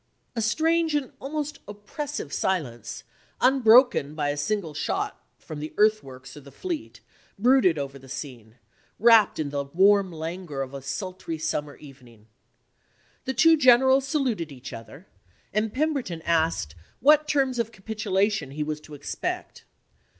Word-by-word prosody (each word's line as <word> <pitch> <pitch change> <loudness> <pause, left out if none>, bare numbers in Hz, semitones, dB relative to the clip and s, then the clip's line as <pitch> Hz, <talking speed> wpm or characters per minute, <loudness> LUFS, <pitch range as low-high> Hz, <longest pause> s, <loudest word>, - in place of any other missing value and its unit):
A 230 - -1
strange 320 +7 +1
and 285 -3 -1
almost 295 +2 -4
oppressive 210 - -6
silence, 135 - -2 0.4
unbroken 245 - +5
by 145 -2 -1
a - - -3
single 160 +2 -2
shot - - -3
from 155 - -9
the 155 +1 -7
earthworks 135 -13 0
or - - -9
the 140 -1 -14
fleet, 340 - -6 0.4
brooded 230 -6 +4
over 140 -1 -5
the 135 0 -15
scene, 120 -5 -8 0.4
wrapt 225 -1 +5
in 150 -3 -3
the 140 -1 -2
warm 190 +6 +3
languor 160 -3 -5
of 135 0 -10
a 140 - -6
sultry 165 +4 -5
summer 150 -2 -3
evening. 125 -7 -16 1.0
The 265 0 -2
two 325 +5 +6
generals 265 0 +5
saluted 245 - -1
each 130 -1 -9
other, 115 - -11 0.5
and 215 +1 0
Pemberton 260 - -2
asked 160 - 0 0.3
what 300 +3 +5
terms 265 -4 +1
of 230 -1 -1
capitulation 200 - -1
he 150 +2 -3
was 150 0 -4
to 150 -1 -11
expect. 145 - -5
190 Hz, 145 wpm, -25 LUFS, -, 1.0 s, two